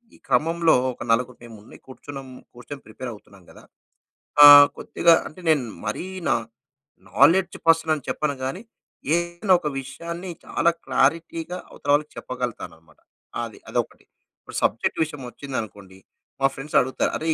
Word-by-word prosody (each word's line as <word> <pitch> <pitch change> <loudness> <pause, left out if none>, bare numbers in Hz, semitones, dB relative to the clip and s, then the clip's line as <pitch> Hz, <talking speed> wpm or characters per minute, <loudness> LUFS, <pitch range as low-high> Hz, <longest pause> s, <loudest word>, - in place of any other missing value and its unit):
ఈ - - -19
క్రమంలో 165 +1 +2 0.2
ఒక 120 - -9
నలుగురు 125 +2 0
మేము 115 -3 -12 0.3
కూర్చున్నాం, 135 0 -10 0.3
కూర్చొని 135 +3 -10
ప్రిపేర్ 120 +3 -8
అవుతున్నాం 100 -3 -17
గదా! - - -16 0.8
ఆహ్, 145 0 +11
కొద్దిగా 170 -1 +3
అంటే 165 - -14
నేను 150 -4 +3 0.2
మరీ 105 - -3 0.2
నా - - +3 0.8
నాలెడ్జ్ 170 - +4
పర్సనని 160 -3 +3
చెప్పను 150 -2 -1
గాని. 155 +10 -4 0.5
ఏదైనా 175 +3 0
ఒక 150 - -4
విషయాన్ని 170 +6 -7 0.2
చాలా 170 - +1 0.2
క్లారిటీగా 165 +6 0
అవతల 145 - -10
వాళ్ళకి 150 +1 +1
చెప్పగలతానన్నమాట. 90 -11 -7 0.4
అది - - -8
అదొకటి. - - -3 0.4
ఇప్పుడు - - -12
సబ్జెక్ట్ - - 0
విషయం 150 -3 -7
వచ్చింది 130 +3 -9
అనుకోండి 100 -3 -12 0.4
మా 135 - +5
ఫ్రెండ్స్ 140 +3 -8
అడుగుతారు 130 +1 -1
"అరె! 160 - -5
145 Hz, 135 wpm, -23 LUFS, 125-165 Hz, 0.8 s, ఆహ్